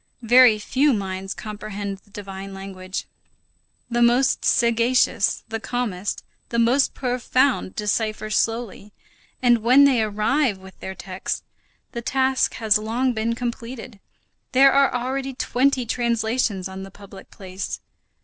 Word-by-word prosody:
Very 240 -1 +6
few 270 +7 +2
minds 190 -2 -4
comprehend 205 -2 -6
the 205 - -28
divine 195 -1 -8
language. 190 -1 -6 0.8
The 240 0 -1
most 245 +3 +3
sagacious, 235 -1 +2
the 225 0 -3
calmest, 215 -6 -3 0.3
the 235 - -2
most 245 +4 +3
profound, 255 -3 0
decipher 215 0 -2
slowly, 220 -1 -2 0.5
and 240 -1 +5
when 250 +5 +6
they 265 -5 +4
arrive 215 +3 +1
with 190 0 -15
their 190 - -6
text, 190 0 -5 0.5
the 235 - -5
task 265 +2 +1
has 220 -2 +2
long 240 +4 0
been 230 +1 -1
completed; 235 -1 -6 0.5
there 270 +1 +6
are 275 0 +4
already 265 +2 -3
twenty 255 0 +1
translations 230 -4 -1
on 190 0 -8
the 195 - -8
public 195 0 -14
place. 190 -1 -6
230 Hz, 130 wpm, -23 LUFS, 200-250 Hz, 0.8 s, Very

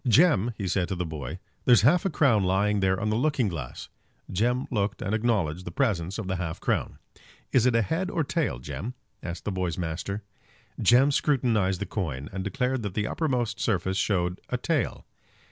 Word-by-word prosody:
"Jem," 120 - +5
he 100 - -3
said 95 -1 +1
to 95 - -2
the 90 0 -2
boy, 80 -1 -5 0.3
"there's 120 -4 +6
half 165 - +4
a - - +3
crown 135 - +3
lying 100 +3 +2
there 95 -1 +2
on 110 0 0
the - - +1
looking 135 -1 +1
glass." 75 -9 -6 0.4
Jem 120 +7 +1
looked 105 -3 0
and 100 - -2
acknowledged 105 -8 0
the 85 - -5
presence 95 -4 0
of 110 -4 -4
the 95 -1 -1
half 85 -2 -4
crown. - - -1 0.5
"Is 125 -1 +4
it 125 - +3
a 115 - +4
head 180 - -1
or 170 - 0
a - - -1
tail, 150 - -1
Jem?" 110 - -6 0.3
asked 85 0 -6
the 105 - -1
boy's 90 -3 -2
master. 90 +4 -3 0.6
Jem 130 +4 +5
scrutinized 115 -10 +2
the - - -2
coin, 75 -9 -4
and 95 0 -3
declared 125 +4 -1
that 100 -4 -5
the 105 - 0
uppermost 125 -9 -1
surface 95 -3 0
showed 90 -3 0
a 125 - 0
tail. 145 +1 -1
105 Hz, 195 wpm, -27 LUFS, 90-125 Hz, 0.6 s, there's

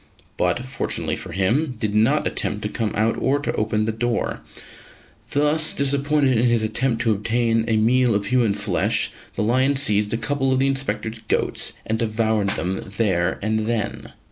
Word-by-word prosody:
but, 90 +8 0
fortunately 130 - -1
for - - -8
him, 125 - 0
did 105 -2 -1
not 110 +1 +2
attempt - - -2
to - - 0
come 110 -3 -2
out 110 +2 +1
or 135 +2 +2
to 145 - -3
open 105 0 0
the 110 - 0
door. 115 +2 -2 0.9
Thus 150 +2 +2
disappointed 140 -2 +2
in 120 - +2
his 120 -2 +2
attempt 115 +2 0
to 115 - +2
obtain 115 +2 +1
a 110 - +2
meal 120 +1 +3
of 100 0 -1
human 115 -3 +2
flesh, - - 0 0.2
the - - -1
lion 130 +5 +2
seized 105 -5 +2
a 115 - +1
couple 135 +4 0
of 130 - +2
the 135 - +2
Inspector's 115 -5 -2
goats - - -1
and 110 0 -1
devoured 110 -2 0
them 95 +3 -2 0.2
there 95 -5 +1
and 110 0 0
then. 115 -2 -3
115 Hz, 175 wpm, -22 LUFS, 110-130 Hz, 0.9 s, meal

